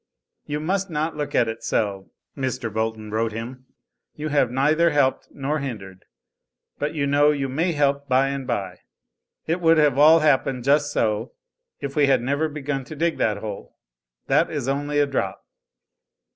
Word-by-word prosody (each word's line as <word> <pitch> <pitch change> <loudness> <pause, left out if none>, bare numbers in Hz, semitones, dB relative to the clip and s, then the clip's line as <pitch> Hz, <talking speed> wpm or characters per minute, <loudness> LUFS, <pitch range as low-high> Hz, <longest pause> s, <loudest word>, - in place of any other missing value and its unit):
"You 150 0 -2
must 190 +5 -1
not 155 0 -2
look 150 -1 -4
at 115 - +3
it 110 0 -5
so!" 100 -3 -1 0.3
Mr. 130 -5 -3
Bolton 110 -1 -3
wrote 110 0 -1
him. 125 +3 -7 0.5
"You 155 +1 -4
have 140 -4 +2
neither 150 +7 +3
helped 145 -4 +1
nor 145 +3 -2
hindered 100 -9 -7 0.7
but 145 +2 -2
you 140 -2 0
know 145 +1 +4
you 140 -2 0
may 165 +7 0
help 140 -1 0
by 130 +1 +3
and 135 -2 -4
by. 95 -3 -3 0.7
It 170 +3 -1
would 165 -1 +5
have 145 -3 +3
all 160 +2 +7
happened 135 -4 +2
just 145 +2 +2
so, 110 +2 -1 0.5
if 140 -1 -5
we 145 -2 +4
had 130 -3 +3
never 145 +5 0
begun 145 -2 -4
to 155 - -9
dig 165 +2 -1
that 105 -2 +1
hole. 105 -1 -8 0.5
That - - +2
is - - -3
only 145 +2 -1
a 145 - +4
drop. 100 -8 -3
140 Hz, 170 wpm, -23 LUFS, 120-150 Hz, 0.7 s, all